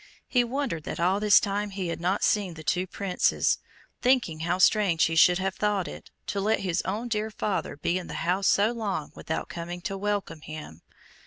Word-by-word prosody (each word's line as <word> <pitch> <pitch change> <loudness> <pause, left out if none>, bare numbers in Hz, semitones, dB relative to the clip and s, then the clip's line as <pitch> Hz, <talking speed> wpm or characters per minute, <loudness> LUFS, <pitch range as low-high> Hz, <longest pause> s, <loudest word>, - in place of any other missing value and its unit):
He 245 -1 +2
wondered 240 - -2
that - - -5
all 185 +4 +2
this 210 -1 +6
time 205 0 -2
he 190 -3 -4
had 170 - -4
not 185 +3 0
seen 195 -5 +1
the 160 - -9
two 180 +4 0
Princes, 185 0 +1 0.4
thinking 245 -11 +2
how 170 +3 0
strange 185 -3 +4
he 165 - +1
should 175 +2 +6
have 190 0 -1
thought 205 -2 0
it, - - -9 0.2
to 200 - -2
let 215 +3 +1
his 180 -2 0
own 215 +6 -2
dear 220 -1 -1
father 205 -7 -2
be 170 +5 0
in 180 - -8
the - - -6
house 185 +3 +1
so 205 +3 +4
long 205 -10 -3
without 160 - -4
coming 175 +1 -6
to 195 - -3
welcome 200 -5 -2
him. 155 - -9
190 Hz, 200 wpm, -27 LUFS, 170-210 Hz, 0.4 s, this